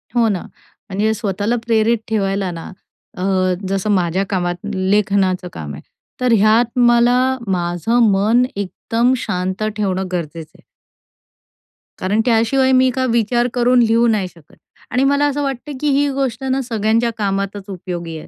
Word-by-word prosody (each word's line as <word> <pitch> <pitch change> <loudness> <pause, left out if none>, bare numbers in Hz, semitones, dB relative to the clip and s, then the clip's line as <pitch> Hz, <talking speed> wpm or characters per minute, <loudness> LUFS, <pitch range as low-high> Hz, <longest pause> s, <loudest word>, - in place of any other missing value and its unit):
हो 235 -1 +4
ना, 190 -4 -1 0.5
म्हणजे 210 +3 0
स्वतःला 210 +1 -1
प्रेरित 230 0 +2
ठेवायला 195 -3 -1
ना 165 -1 -7 0.5
अ, 180 - -4 0.4
जसं 195 +2 -1
माझ्या 185 -1 +1
कामात 175 -3 -1 0.2
लेखनाचं 190 -1 +1
काम 75 -2 -7
आहे. 70 - -9 0.4
तर 250 -1 +2
ह्यात 225 +4 +3
मला 240 0 +4 0.3
माझं 180 +5 0
मन 215 +5 +3
एकदम 225 +5 0
शांत 185 -3 -3
ठेवणं 190 -2 -1
गरजेचं 165 -2 -5
आहे. - - -21 1.4
कारण 200 +4 +1
त्याशिवाय 250 +3 +2
मी 260 0 +4
काय 260 -1 0
विचार 240 +1 +1
करून 245 0 +3
लिहू 230 +1 +3
नाही 210 -5 +1
शकत 165 -4 -19 0.4
आणि 255 - +1
मला 280 +1 +3
असं 290 +1 -2
वाटतं 275 +1 -4
की 300 - -1
ही 285 +1 +2
गोष्ट 265 -3 -2
ना 265 0 0
सगळ्यांच्या 230 -1 0
कामातच 200 -1 -2
उपयोगी 175 -3 -6
आहे. 155 - -10
215 Hz, 150 wpm, -18 LUFS, 190-240 Hz, 1.4 s, हो